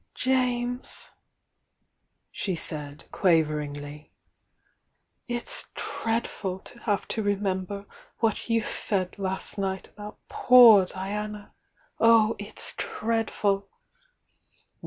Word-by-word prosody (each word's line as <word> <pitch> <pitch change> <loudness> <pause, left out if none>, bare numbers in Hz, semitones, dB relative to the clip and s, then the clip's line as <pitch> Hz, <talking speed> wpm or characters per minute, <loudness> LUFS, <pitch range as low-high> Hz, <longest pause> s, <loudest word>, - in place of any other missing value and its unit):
"James," 250 -1 -1 1.2
she 190 -4 -2
said, 150 -3 -5
quaveringly, 150 -4 0 1.2
"it's 240 -1 -4
dreadful 225 -4 -2
to 235 +5 -15
have 210 -4 -1
to 220 - -1
remember 200 -1 -2 0.3
what 225 +1 -1
you 230 -1 +2
said 190 -1 -2
last 190 +1 -2
nig^t 190 -1 -3
about 210 0 -10
poor 230 -6 +7
Diana!— 205 +2 -5 0.5
oh, 225 -1 +5
it's 205 +1 -7
dreadful!" 215 -3 -1
205 Hz, 85 wpm, -27 LUFS, 185-225 Hz, 1.2 s, poor